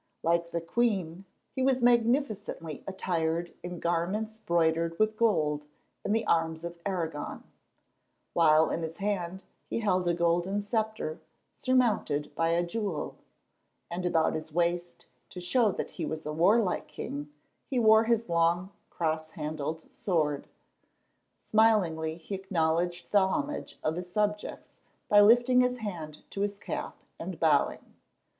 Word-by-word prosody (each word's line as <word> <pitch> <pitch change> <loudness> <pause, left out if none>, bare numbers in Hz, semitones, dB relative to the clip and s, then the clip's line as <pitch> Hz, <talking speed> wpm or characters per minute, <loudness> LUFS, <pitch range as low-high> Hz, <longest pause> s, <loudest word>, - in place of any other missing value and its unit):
Like 170 +1 +2
the 170 0 -2
queen, 190 -2 -1 0.3
he 260 - -2
was 260 -1 +2
magnificently 230 - +1
attired 170 -3 -1
in 175 -1 -6
garments 190 +7 -1
broidered 165 -2 +1
with 215 0 +2
gold 150 -10 +1 0.4
and 205 - +1
the 225 - 0
arms 165 -1 +1
of 170 0 -6
Aragon, 165 -6 -3 0.9
while 160 -1 +5
in - - -1
his 160 0 -5
hand 190 -2 -2 0.3
he - - -1
held 185 -4 +1
a 170 - +2
golden 175 +3 +1
sceptre 215 -7 -2 0.3
surmounted 235 - +1
by 165 0 +1
a 170 +1 +2
jewel, 195 -4 -3 0.8
and 175 +1 -3
about 165 -3 +2
his 155 0 -5
waist, 175 +1 -1 0.2
to 180 - -8
show 215 +5 +2
that - - -4
he 165 - -4
was 155 0 -5
a 150 - -3
warlike 190 +5 +3
king, 145 +1 -6 0.4
he 265 - -2
wore 220 -1 +6
his 230 0 +1
long, 170 +2 +2 0.2
cross 160 -1 -2
handled 155 0 -4
sword. 155 -6 0 0.9
Smilingly 180 -8 +2
he 175 +4 -8
acknowledged 175 -2 -1
the 205 - +6
homage 290 +9 -3
of 160 +2 0
his 180 0 -6
subjects 210 +1 -2 0.3
by 205 0 +7
lifting 240 +4 +6
his 250 0 +1
hand 170 -9 -6
to 195 - -4
his 205 0 -1
cap - - -5 0.2
and 180 +1 -6
bowing. 155 -3 +1
175 Hz, 140 wpm, -29 LUFS, 160-210 Hz, 0.9 s, by